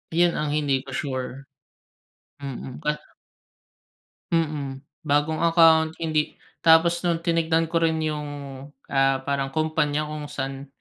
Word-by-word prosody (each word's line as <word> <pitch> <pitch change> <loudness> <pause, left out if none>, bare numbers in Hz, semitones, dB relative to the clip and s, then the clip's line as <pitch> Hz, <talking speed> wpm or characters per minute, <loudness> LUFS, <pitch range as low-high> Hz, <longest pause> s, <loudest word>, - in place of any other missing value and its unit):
Yun, 175 -1 +3
ang 150 -1 -1
hindi 140 -3 +1
ko - - -7
sure. 135 0 -4 0.9
Mm. 135 -1 -7
Ka 150 -1 0 1.4
Mm, 150 -5 -1 0.2
bagong 150 +2 +2
account. 165 -1 +5
Hindi 155 -2 0 0.2
Tapos 170 +1 +5
nung 170 -2 -1
tinignan 165 -1 +2
ko 165 - +2
rin 165 -1 +2
yung, 150 -1 -2 0.6
ah, 135 -1 +2
parang, 140 0 -1
kumpanya 155 -1 +1
kung 150 -1 -6
saan 135 -1 -5
150 Hz, 120 wpm, -24 LUFS, 140-165 Hz, 1.4 s, account